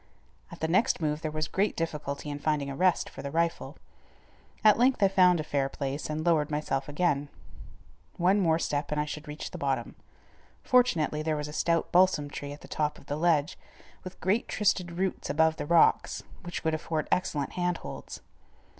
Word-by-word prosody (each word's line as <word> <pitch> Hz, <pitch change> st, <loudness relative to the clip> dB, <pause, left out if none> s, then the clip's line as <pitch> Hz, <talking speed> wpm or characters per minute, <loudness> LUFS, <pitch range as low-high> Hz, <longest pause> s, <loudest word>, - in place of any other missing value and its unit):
At -, -, -11 dB
the 160 Hz, -, +1 dB
next 185 Hz, +8 st, +2 dB
move 150 Hz, -1 st, -1 dB
there 155 Hz, -, -2 dB
was 155 Hz, 0 st, -2 dB
great 200 Hz, +1 st, 0 dB
difficulty 150 Hz, -3 st, -3 dB
in 145 Hz, -, -5 dB
finding 145 Hz, -2 st, -1 dB
a -, -, -5 dB
rest 185 Hz, +4 st, +2 dB
for -, -, -9 dB
the 140 Hz, -, -5 dB
rifle. 165 Hz, +3 st, -1 dB, 0.9 s
At 215 Hz, 0 st, +6 dB
length 250 Hz, -3 st, +3 dB
I -, -, +7 dB
found 180 Hz, -2 st, +4 dB
a -, -, -1 dB
fair 140 Hz, -2 st, -1 dB
place, 140 Hz, +2 st, -4 dB
and 155 Hz, +1 st, -3 dB
lowered 160 Hz, -4 st, +2 dB
myself 150 Hz, -2 st, -2 dB
again. 145 Hz, -2 st, 0 dB, 0.9 s
One 185 Hz, +4 st, +3 dB
more 165 Hz, -4 st, +3 dB
step 145 Hz, -3 st, -2 dB
and 150 Hz, -, 0 dB
I 150 Hz, -, +1 dB
should 150 Hz, +1 st, -7 dB
reach 150 Hz, +1 st, -6 dB
the -, -, -7 dB
bottom. 135 Hz, -4 st, -1 dB, 0.7 s
Fortunately 240 Hz, -, +2 dB
there 155 Hz, 0 st, -1 dB
was 150 Hz, 0 st, -4 dB
a 150 Hz, -, -8 dB
stout 165 Hz, +1 st, 0 dB
balsam 175 Hz, -5 st, +3 dB
tree 145 Hz, 0 st, -6 dB
at 145 Hz, -, -10 dB
the -, -, -12 dB
top 150 Hz, -1 st, -1 dB
of -, -, -16 dB
the 145 Hz, -, -3 dB
ledge, 155 Hz, -2 st, +1 dB, 0.4 s
with 185 Hz, 0 st, -9 dB
great 200 Hz, +6 st, +1 dB
twisted 185 Hz, -4 st, 0 dB
roots 185 Hz, +2 st, -2 dB
above 160 Hz, +2 st, +2 dB
the -, -, -4 dB
rocks, 170 Hz, 0 st, +3 dB, 0.2 s
which 175 Hz, -1 st, -6 dB
would 160 Hz, -, +1 dB
afford 155 Hz, 0 st, -2 dB
excellent 145 Hz, -6 st, 0 dB
hand 180 Hz, -1 st, -1 dB
holds. -, -, -8 dB
155 Hz, 195 wpm, -28 LUFS, 150-175 Hz, 0.9 s, I